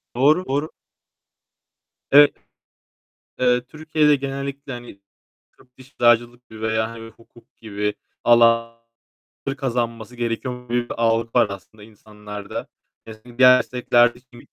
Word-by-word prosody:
Doğru, 150 +8 +3
doğru. 145 +4 -2 1.4
Evet. 145 +1 +7 1.1
Eee, 125 -1 +2
Türkiye'de 155 +2 +1
genellikle, 140 0 -6
hani, 120 -5 -10 0.6
tıp, 125 0 -25
diş, 130 - -14
eczacılık 120 +1 +3
veya 110 0 -2
hani 115 0 -10
hukuk 115 +1 -22
gibi 105 -1 -4 0.3
alanları 115 +3 0
kazanması 120 -3 -3
gerekiyormuş 120 +1 -4
gibi 120 0 -1
bir - - -3
algı 115 0 +1
var 120 -3 +4
aslında 100 +2 -11
insanlarda. 105 -1 -9 0.4
Mesela 110 +2 -13
diğer 125 -1 +8
meslekler 120 -1 +2
de, 120 - -16
şimdiki 120 - -17
120 Hz, 115 wpm, -21 LUFS, 115-125 Hz, 1.4 s, diğer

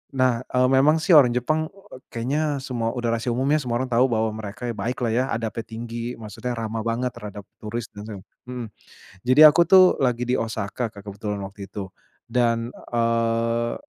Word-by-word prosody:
Nah, 130 -3 +2
eee, 125 0 +2
memang 140 +4 +5
sih, 180 - +1
orang 130 -6 +7
Jepang 155 +6 0
eee, 195 -8 -15
kayaknya 125 +6 -2 0.2
semua, 115 -2 -2
udah 120 -1 -1
rahasia 115 +1 -2
umum 130 - 0
ya, 155 - +4
semua 120 -4 -3
orang 130 - -7
tahu 125 +3 +4
bahwa 110 -2 0
mereka 110 +2 -8
baik 120 +4 -3
lah, 115 - +1
ya. 125 +3 +2
Adabnya 115 0 -3
tinggi, 115 +1 -5
maksudnya 115 +3 -6
ramah 115 0 -3
banget 120 +2 -1
terhadap 105 -1 -9 0.2
turis 110 +1 -5
dan 105 0 -9
se 110 - -6 0.3
mhm. 125 -2 -5 0.6
Jadi 130 +4 +4
aku 170 +3 +4
tuh, 185 +2 +6
lagi 125 -2 0
di 125 - +2
Osaka 115 +1 -3
Kak, 100 - -11
kebetulan 100 0 -4
waktu 100 +1 -8
itu. 100 -2 -5 0.4
Dan, 115 -1 +1 0.2
eee 115 0 +1
115 Hz, 185 wpm, -23 LUFS, 110-125 Hz, 0.6 s, orang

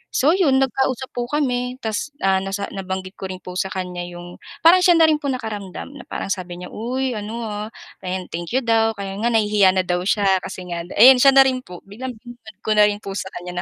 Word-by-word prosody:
So, 290 +5 +4
'yon 340 -8 +3
nagkausap 260 -1 -1
po 240 0 -3
kami 250 -3 -1
ta's, 220 +7 -2
ah, 190 0 +3
nasa 195 +1 -3
nabanggit 190 0 -5
ko 190 - -4
rin 185 0 -6
po 180 - -8
sa 190 - 0
kanya 180 -2 -5
'yong 175 0 -10 0.2
parang 350 +3 +7
siya 360 -1 +5
na 330 - +5
rin 300 - +1
po 285 - -4
nakaramdam 220 -4 -5
na 280 -4 -12
parang 195 - -4
sabi 180 -2 -4
niya, 180 - -9
uy, 255 +4 -2
ano, 225 +2 -5
ah, 210 -1 -4 0.3
ayan 185 0 -4
thank 170 +7 -5
you 260 - +2
daw 225 -1 +2
kaya 195 0 -6
nga 235 - 0
nahihiya 210 -4 +3
na 185 - +2
daw 180 0 -1
siya 195 -3 +3
kasi 185 0 -8
nga 170 0 -4
daw - - -10
ayun, 250 +3 +8
siya 275 +1 +6
na 270 - +9
rin 260 -1 0
po 180 -8 -12
biglang 240 +5 -7
binanggit 230 -3 -14
ko 215 - -1
na 210 -1 +6
rin 205 0 -2
po 195 - -6
sa 190 - -4
kanya 180 0 -6
210 Hz, 240 wpm, -21 LUFS, 190-255 Hz, 0.3 s, na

